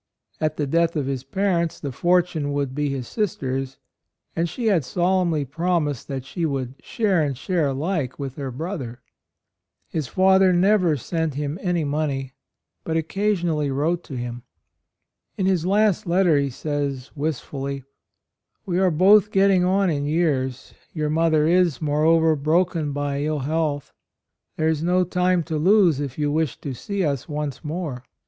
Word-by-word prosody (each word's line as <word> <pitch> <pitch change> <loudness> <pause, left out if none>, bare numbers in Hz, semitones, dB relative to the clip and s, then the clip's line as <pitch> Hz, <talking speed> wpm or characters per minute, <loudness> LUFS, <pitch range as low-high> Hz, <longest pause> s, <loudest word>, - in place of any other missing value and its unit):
At 155 -1 -1
the 150 - 0
death 165 +4 +1
of 145 -3 0
his 135 -1 -3
parents 170 +2 0
the 140 - -4
fortune 170 -1 +1
would 140 -2 -1
be 145 +1 -1
his 135 -3 -4
sister's, 135 - -2 0.6
and 165 +1 0
she 235 +9 -6
had 205 -4 +4
AND - - 0
MOTHER. 130 - -12
89 - - -12
solemnly 175 -4 +2
promised 155 -2 -1
that 135 -2 -5
she 170 +5 -4
would 135 -5 -2
"share 200 -7 +1
and 140 -4 -1
share 165 +2 0
alike" 140 0 -2
with 135 -3 -5
her 140 -2 -4
brother. 130 - -6 0.8
His 155 -5 -3
father 190 +3 +4
never 180 -3 +3
sent 160 +2 -2
him 145 +3 -3
any 175 -4 0
money, 140 -3 -2 0.5
but 160 0 -1
occasionally 170 -3 0
wrote 160 +6 0
to 135 - -7
him. 120 0 -5 1.0
In 190 - 0
his 185 -3 +1
last 205 -2 +2
letter 175 -2 +3
he 140 0 0
says, 140 -1 -3
wistfully: 140 -2 -3 0.8
"We 180 -1 0
are 190 -1 +4
both 195 +5 +5
getting 195 -2 +4
on 190 0 +2
in 145 -2 -1
years; 145 -5 -1 0.2
your 150 -2 -1
mother 160 -1 +3
is, 175 -4 +3
moreover, 160 +2 +3
broken 160 +1 +1
by 145 0 -2
ill 155 +1 -1
health.... 150 0 -2 0.6
There 155 - +1
is 160 -2 +1
no 180 +2 +2
time 180 0 +1
to 160 -1 -3
lose 180 -2 +4
if 140 -3 -4
you 145 -1 0
wish 155 -1 0
to 140 - -4
see 195 +8 -2
us 140 -2 -2
once 150 -2 -4
more. 155 -5 -4
155 Hz, 165 wpm, -23 LUFS, 140-180 Hz, 1.0 s, both